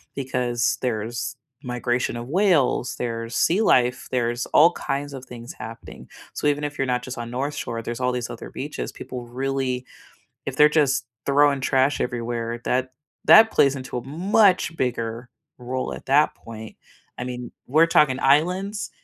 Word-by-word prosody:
because 125 -4 0
there's 120 +4 -3 0.3
migration 125 -1 -1
of 120 +1 -6
whales, 165 -8 +2
there's 115 -1 -4
sea 185 +6 +3
life, 125 - +2
there's 120 -1 0
all 165 +3 +6
kinds 145 0 -3
of 130 -1 -8
things 120 -1 -9
happening, 115 +1 -9 0.3
so - - -1
even 145 0 +1
if 145 0 -4
you're 135 - 0
not 125 0 0
just 130 +1 -7
on 120 0 -5
North 140 +4 -2
Shore, 115 -1 -4
there's 120 +2 -5
all 125 0 +1
these 125 -1 -3
other - - -8
beaches. - - -5
People 125 -2 -8
really 130 0 -2 0.6
if - - -4
they're 150 - +7
just 135 -4 0 0.2
throwing 140 0 +4
trash 135 +1 +2
everywhere, 120 -1 -3
that 130 +1 0 0.4
that 220 0 +8
plays 140 0 +4
into 130 -2 -5
a 120 - -7
much 180 +3 +2
bigger 120 -2 -2 0.3
role 130 +1 -4
at - - -11
that 145 +3 +3
point. 110 -1 -10 0.4
I 125 - -3
mean, 125 -1 -6 0.2
we're 155 +5 +5
talking 145 -5 +3
islands, 180 +9 +1
130 Hz, 165 wpm, -23 LUFS, 120-145 Hz, 0.6 s, that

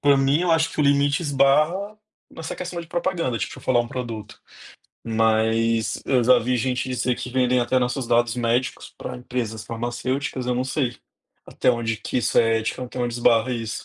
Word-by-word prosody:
Pra 145 -1 +5
mim, 135 +5 +2
eu 175 -2 +2
acho 165 0 +2
que 155 - -3
o - - +3
limite 140 +2 +3
esbarra 155 +9 +2 0.3
nessa 160 0 -6
questão 175 -1 -5
de 165 - -10
propaganda, 170 -7 -1
tipo, - - -4
eu - - -14
falar 120 -2 +3
um 120 - -4
produto, 115 -4 -6 0.6
mas 115 0 +1
eu 125 -3 +2
já 125 - +6
vi 125 +2 0
gente 125 +1 -1
dizer 125 0 0
que - - -6
vendem 125 -1 +2
até 125 +2 +2
nossos 125 0 -1
dados 120 0 +2
médicos 120 +2 -1
pra - - -6
empresas 120 -3 -4
farmacêuticas. 125 +3 -3
Eu 125 - 0
não 125 - -1
sei 130 -2 -1 0.5
até - - +1
onde 115 -2 -1
que 125 - -2
isso 120 - +1
é 115 0 +3
ético, 110 +3 -3
até 125 0 -7
onde 120 -1 -1
esbarra 120 +1 +3
isso. 115 -2 -4
125 Hz, 195 wpm, -23 LUFS, 115-140 Hz, 0.6 s, já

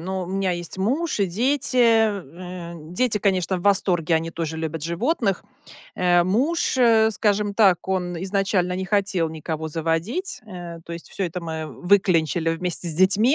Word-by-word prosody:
но 190 +2 -3
у - - -9
меня 190 +1 -1
есть 175 +1 -5
муж 270 - 0
и 200 - +3
дети. 255 +8 0
Э, 185 - +1 0.2
дети, 215 +2 +1
конечно, 190 -2 +1
в 175 - -6
восторге. 180 -4 +2
Они 165 +1 -3
тоже 160 -1 -4
любят 160 -1 -4
животных. 195 - -1 0.5
Э, 175 -1 +3
муж, 260 - +1
э, 225 -3 +5
скажем 205 -1 0
так, 195 -5 +4
он 180 -3 -2
изначально 195 -2 0
не 190 +1 -3
хотел 195 -4 +1
никого 160 0 -5
заводить. 165 - -2
Э, 175 -5 -8
то 170 - -8
есть 170 -1 -8
всё 195 - -3
это 180 0 -4
мы 160 -2 -5
выклянчили 175 -3 +2
вместе 175 +1 -2
с 160 - -1
детьми- 200 - +4
185 Hz, 165 wpm, -23 LUFS, 170-210 Hz, 0.5 s, э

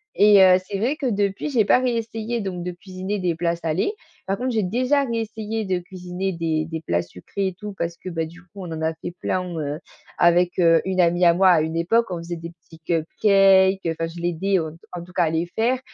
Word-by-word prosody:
et 205 -2 +7
heu, 185 -1 +7
c'est 200 - -3
vrai 260 +7 0
que 290 - -4
depuis, 205 +4 -1
j'ai 245 -6 +3
pas 250 - +5
réessayé 230 -1 -2
donc 185 -3 -4
de 180 - -2
cuisiner 185 +3 -5
des 180 -2 0
plats 170 +1 0
salés. 170 - -1 0.3
Par 195 +1 0
contre, 255 - -2
j'ai 220 -2 0
déjà 255 +9 +1
réessayé 225 -2 -3
de 185 -1 0
cuisiner 180 +1 -5
des 160 -2 -1
des 160 0 -5
plats 85 - 0
sucrés 90 - -5
et 185 - -11
tout 210 0 -7
parce 170 0 -3
que, 185 - -7
bah, 165 -1 -2
du 170 +3 -13
coup, 175 - -26
on 185 -4 -7
en 160 - -5
a 160 0 0
fait 165 - -7
plein, 185 0 -1 0.2
heu, 150 +1 -3 0.4
avec, 175 +1 +3
heu, 165 -1 +5
une 190 -1 -2
amie 175 +1 +2
à 170 - +6
moi 190 +2 +4
à 165 - +4
une 160 +1 -2
époque, 225 +8 +2
on 175 - -2
faisait 170 +1 -5
des 165 +1 -8
petits 165 -1 -19
cupcakes. 190 +3 +3
Enfin 165 0 -2
je 175 - -9
l'aidais, 175 +3 0
heu, 160 -1 -4
t - - -22
en 175 - -5
tout 180 +1 -15
cas 175 - +2
à 160 - 0
les 165 +1 0
faire, 245 +3 +1
180 Hz, 240 wpm, -23 LUFS, 170-205 Hz, 0.4 s, et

